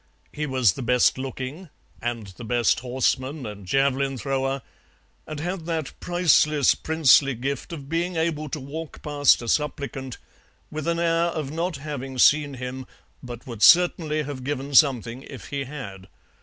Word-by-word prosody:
He 150 0 -3
was 130 -6 +3
the - - -7
best 125 +1 +3
looking, 135 +6 -6 0.3
and 115 -2 -3
the 95 +5 -11
best 120 0 +2
horseman 130 +3 -1
and 100 -3 -8
javelin 135 +3 +1
thrower, 135 +1 -2 0.6
and 155 -1 -6
had 175 +1 -4
that 160 -4 -3
priceless 155 -5 +3
princely 145 -4 +4
gift 135 +7 -4
of 145 -5 -7
being 170 +3 -1
able 160 -2 -1
to 150 - -4
walk 150 +4 -8
past 145 -4 +3
a - - -7
supplicant 135 -2 -2 0.5
with 155 +1 -5
an 170 0 +1
air 170 0 +2
of 155 -5 -3
not 165 0 -2
having 135 -2 -6
seen 145 +2 +4
him, 125 0 -6 0.3
but 120 -2 -9
would 115 -4 -8
certainly 165 -2 +5
have 140 -3 -6
given 140 +1 -4
something 130 -4 +3
if 135 -2 -10
he 140 -1 -3
had. 100 -9 -8
140 Hz, 155 wpm, -24 LUFS, 130-155 Hz, 0.6 s, certainly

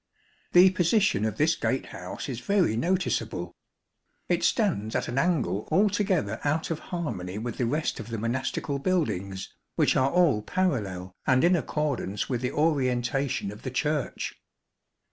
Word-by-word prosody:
The 185 +1 +8
position 185 - +2
of 110 - -2
this 160 +2 +3
gatehouse 95 -8 -3
is 125 -4 -4
very 180 - +2
noticeable. 115 - -1 0.8
It - - +1
stands 105 +2 +1
at - - 0
an 125 +3 -1
angle 155 - 0
altogether 190 - +2
out 155 +3 0
of 160 - -2
harmony 110 - -3
with 115 +1 -5
the 120 - +1
rest 155 +6 -1
of 110 - -7
the 115 -1 -4
monastical 130 +4 -2
buildings, 100 - -1 0.2
which - - +3
are 130 +1 +3
all 165 -10 +3
parallel 105 - -1
and 130 0 +4
in 175 +2 +5
accordance 145 - -1
with 125 -3 -2
the 125 - -1
orientation 135 -6 0
of 105 +2 -11
the 130 - -4
Church. 150 +3 -1
130 Hz, 145 wpm, -27 LUFS, 110-170 Hz, 0.8 s, The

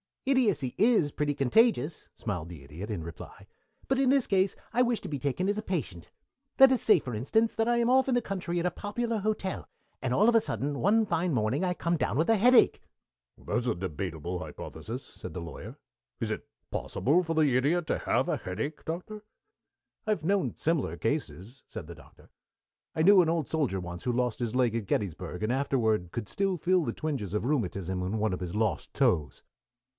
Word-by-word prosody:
"Idiocy 210 - +2
is 215 -9 +4
pretty 145 0 -1
contagious," 150 - +2
smiled 95 -8 -4
the 80 -5 -10
Idiot, 80 +10 -8
in 100 -7 -3
reply, 85 0 -10 0.4
"but 270 0 +1
in 270 -2 +3
this 270 -2 +3
case 190 -1 +2 0.2
I 245 - +2
wish 240 -2 +2
to - - -7
be 145 -2 -3
taken 145 +8 -1
as 205 - 0
a - - -1
patient. 130 - -4 0.5
Let 270 0 +9
us 255 - +2
say, 210 -5 +6
for 125 -3 -6
instance, 220 - +1
that 225 0 +1
I 240 0 +3
am 235 0 +2
off 260 +1 +4
in 260 - +2
the 245 - +2
country 185 -5 -3
at 170 - -2
a 180 - +1
popular 230 +2 -2
hotel, 205 -2 -2 0.3
and 125 -1 -1
all 210 - +5
of 235 - +3
a 225 - +6
sudden 140 - -3
some 220 +4 +4
fine 175 -3 0
morning 120 - 0
I 180 -1 +1
come 170 -1 -1
down 120 -5 -1
with 160 +6 +1
a 225 - +6
headache 245 +4 +5 0.3
" - - -59
"That's 120 +1 0
a - - +1
debatable 90 -1 -4
hypothesis," 115 +6 -7
said - - -10
the 90 - -5
Lawyer. 85 - -8 0.4
"Is - - -2
it - - -4 0.2
possible 155 +8 +1
for 165 -1 -2
the 150 -5 +3
Idiot 155 +7 +2
to - - 0
have - - +1
a - - 0
headache, 110 +12 -5
Doctor?" 185 +6 -5 0.8
"I - - +2
have 170 -7 -1
known 195 0 +1
similar 150 - -1
cases," 120 - -3
said - - -8
the - - -9
Doctor. - - -18 0.7
"I 160 - +2
knew 195 +1 +8
an 165 - +1
old 165 -4 0
soldier 140 -12 0
once 90 -1 -7
who 125 - 0
lost 125 -1 -1
his 120 -1 -2
leg 125 -3 +2
at 115 -3 -2
Gettysburg, 95 0 -2
and 110 - +1
years 130 - +1
afterward 110 -10 0
could 115 -3 -5
still 195 -2 0
feel 180 +1 +2
the 115 -5 -2
twinges 130 - -3
of 105 - -1
rheumatism 95 - -1
in 95 +4 -2
one 110 -2 0
of 90 - -3
his 90 0 -5
lost 105 -5 -1
toes." 75 -7 +1
145 Hz, 210 wpm, -29 LUFS, -, 0.8 s, Let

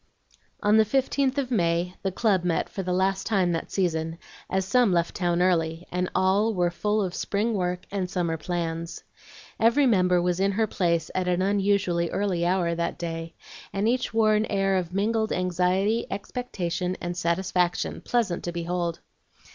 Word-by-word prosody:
On 210 +1 +5
the 220 - +7
15th 270 +3 0
of 265 -3 -1
May 175 -4 +1
the 190 - -1
club 190 -2 +1
met 175 -2 0
for 195 - -4
the 180 -1 -3
last 190 +1 0
time 190 -5 +2
that 165 - -3
season, 165 -3 -1 0.3
as 190 0 0
some 240 +1 +3
left 170 -1 +1
town 175 -1 +1
early, 165 -2 +1
and 180 0 -1
all 195 +4 +2
were 175 -1 +1
full 210 +4 0
of 180 -2 -3
spring 210 +5 -1
work 180 -2 -2
and 190 -2 -2
summer 175 -3 -1
plans. 165 0 -4 0.6
Every 235 +6 +4
member 180 -6 +3
was 175 0 0
in 195 +1 +2
her 220 +3 +2
place 170 -5 0
at 185 -1 -1
an 180 +1 +1
unusually 195 -4 +1
early 185 -4 0
hour 175 -2 +1
that 170 0 -2
day, 165 -1 -5 0.4
and 200 +2 0
each 250 +2 0
wore 220 -1 +3
an 215 +1 +1
air 195 -1 +1
of 180 -2 -1
mingled 220 +3 0
anxiety, 185 +5 +1
expectation, 185 -5 -3
and 175 0 -4
satisfaction, 180 0 0
pleasant 225 -8 0
to 175 - -2
behold. 170 0 -3
185 Hz, 170 wpm, -26 LUFS, 175-205 Hz, 0.6 s, the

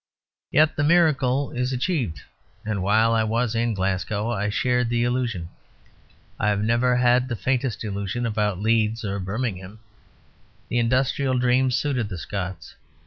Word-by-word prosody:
Yet 155 +1 +3
the 145 - 0
miracle 145 -5 +3
is 125 +1 -2
achieved; 125 - -2 0.4
and 105 -3 -2
while 110 +4 +3
I 110 -1 +2
was 115 +1 0
in 115 -1 0
Glasgow 100 +4 -1
I 105 -2 -1
shared 125 +2 +1
the 120 0 +1
illusion. 120 -8 -1 0.9
I 105 - +2
have 105 0 0
never 120 +3 +2
had 125 +1 +3
the 120 - -3
faintest 130 -1 -1
illusion 100 +2 -3
about 105 -4 -1
Leeds 110 +1 +1
or 100 0 -2
Birmingham. 95 0 -4 0.9
The 120 - +1
industrial 130 +2 +1
dream 125 +1 +2
suited 125 -3 -1
the 90 - -5
Scots. 90 -2 -6
115 Hz, 145 wpm, -24 LUFS, 105-125 Hz, 0.9 s, Yet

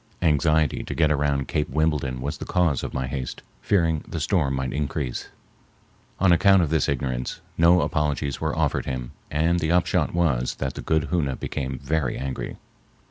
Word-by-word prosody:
Anxiety 80 -1 +2
to - - -5
get 75 -2 +3
around 70 -3 +1
Cape 75 -1 -1
Wimbledon 75 -5 0
was 70 +3 -4
the - - -5
cause 85 -7 +1
of - - -4
my 65 -1 -2
haste, 65 -1 -5 0.2
fearing 85 -6 +1
the 85 - -4
storm 75 -5 +1
might 65 -1 -2
increase. 70 -3 -3 0.9
On 95 -1 +4
account 95 +1 +5
of 80 - -2
this 80 -1 +2
ignorance, 65 -2 -2 0.2
no 85 +2 +5
apologies 75 -2 -1
were - - -1
offered - - 0
him, 65 -2 -4 0.2
and 80 +4 +1
the 80 0 0
upshot 90 -2 +2
was 75 -8 +1
that 65 -2 -3
the - - -6
good 80 -1 0
Hoona 75 -7 +1
became 65 -1 -3
very 70 0 -1
angry. 65 -1 -4
75 Hz, 175 wpm, -24 LUFS, 65-80 Hz, 0.9 s, account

